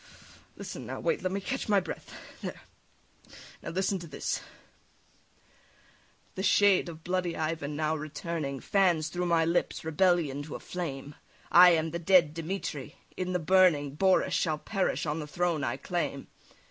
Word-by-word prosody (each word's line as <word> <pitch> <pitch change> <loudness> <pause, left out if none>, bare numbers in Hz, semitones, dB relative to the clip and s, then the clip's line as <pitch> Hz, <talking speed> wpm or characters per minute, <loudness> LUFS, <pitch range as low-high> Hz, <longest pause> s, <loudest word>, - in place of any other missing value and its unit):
Listen - - -7
now, - - -5
wait, 485 -3 0
let 185 - -1
me 195 - -1
catch 255 +4 -4
my 205 -1 +5
breath, 180 -3 -7 0.3
there; - - -6 1.0
now - - -6
listen 190 +2 0
to 170 - -9
this: 150 - -3 1.9
"The - - -4
shade 195 -2 +4
of 160 -1 -10
bloody 180 -1 -1
Ivan 155 -2 -2
now 155 +1 0
returning 155 -2 -4
Fans 175 -6 +2
through 175 +2 -2
my 165 -1 +3
lips 170 -1 -1
rebellion 160 -3 +2
to 150 +1 -7
a - - -6
flame, 145 -5 -5 0.4
I 180 +1 +9
am 160 -1 0
the 170 - -3
dead 170 -3 +4
Dimitri! 165 -4 -5 0.2
In 185 0 -3
the - - +2
burning 170 -5 +3
Boris 190 +5 +2
shall 155 -3 +1
perish 190 +4 -1
on 150 +1 -2
the 150 - -5
throne 170 -1 -1
I 120 -1 -1
claim. 140 -2 -3
170 Hz, 160 wpm, -29 LUFS, 155-185 Hz, 1.9 s, I